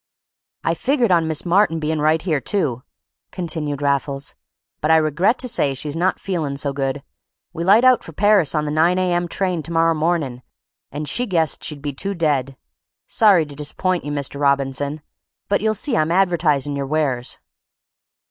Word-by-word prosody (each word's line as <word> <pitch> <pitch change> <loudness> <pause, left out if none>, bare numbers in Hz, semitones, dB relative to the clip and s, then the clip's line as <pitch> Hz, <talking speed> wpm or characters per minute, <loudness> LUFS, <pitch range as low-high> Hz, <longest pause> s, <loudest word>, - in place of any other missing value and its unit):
"I - - +1
figured 250 -6 +1
on 165 -2 +3
Miss 160 +1 -1
Martin 175 -2 +2
bein' 155 0 -2
right 155 +1 +2
here, 155 -7 0
too," 140 - -1 0.5
continued 150 -5 -3
Raffles, 140 0 -1 0.5
"but 155 - 0
I 160 - +6
regret 165 - +2
to 250 - -1
say 150 - +1
she's 145 +2 -5
not 180 +3 0
feelin' 160 -7 -3
so 140 0 -1
good. 135 0 -3 0.5
We 170 - -4
light 205 +7 +5
out 255 -1 +5
for - - -9
Parrus 200 -3 +3
on 150 0 0
the 150 - -3
9 165 +4 +2
A. 185 -1 +1
M. 175 0 0
train 180 -1 -1
to 165 - -8
morrer 165 0 +3
mornin', 155 -6 -1 0.5
and 150 +2 -5
she 245 - -1
guessed 165 -5 0
she'd 145 -3 -4
be 145 -1 -3
too 195 +9 -3
dead. 140 -5 -1 0.5
Sorry 200 -8 +4
to 145 - -11
disappoint 170 +5 -1
you, 145 - -5
Mr. 140 -1 -3
Robinson; 140 +1 0 0.4
but 200 - +1
you'll 220 0 +1
see 250 +4 0
I'm 155 -4 +1
advertisin' 160 -6 +1
your 140 -1 -3
wares." 135 -5 -1
155 Hz, 180 wpm, -20 LUFS, 145-185 Hz, 0.5 s, I